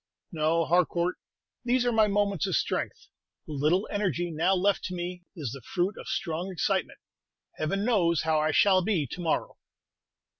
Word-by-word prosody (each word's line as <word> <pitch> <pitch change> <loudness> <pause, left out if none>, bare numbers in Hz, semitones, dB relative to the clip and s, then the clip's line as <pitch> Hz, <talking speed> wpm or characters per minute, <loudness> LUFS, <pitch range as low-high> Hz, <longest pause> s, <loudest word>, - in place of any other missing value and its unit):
"No, 165 0 +1
Harcourt; 175 +1 +1 0.5
these 245 0 +2
are 245 - +2
my 220 -2 +4
moments 200 -4 +1
of - - 0
strength. - - -2 0.4
The 155 - -7
little 155 +8 +1
energy 175 -4 -1
now 170 +5 +2
left 195 +2 +1
to 185 - -4
me 175 0 -5
is 145 -9 -4
the 135 +1 -8
fruit 180 +8 -1
of - - -10
strong 170 +4 -3
excitement. 175 - -1 0.6
Heaven 195 +7 -1
knows 175 -9 +2
how 160 -1 +2
I 155 +1 +1
shall 185 +4 +4
be 180 -6 0
to 175 +8 -7
morrow." 165 -2 -1
175 Hz, 165 wpm, -28 LUFS, 160-200 Hz, 0.6 s, my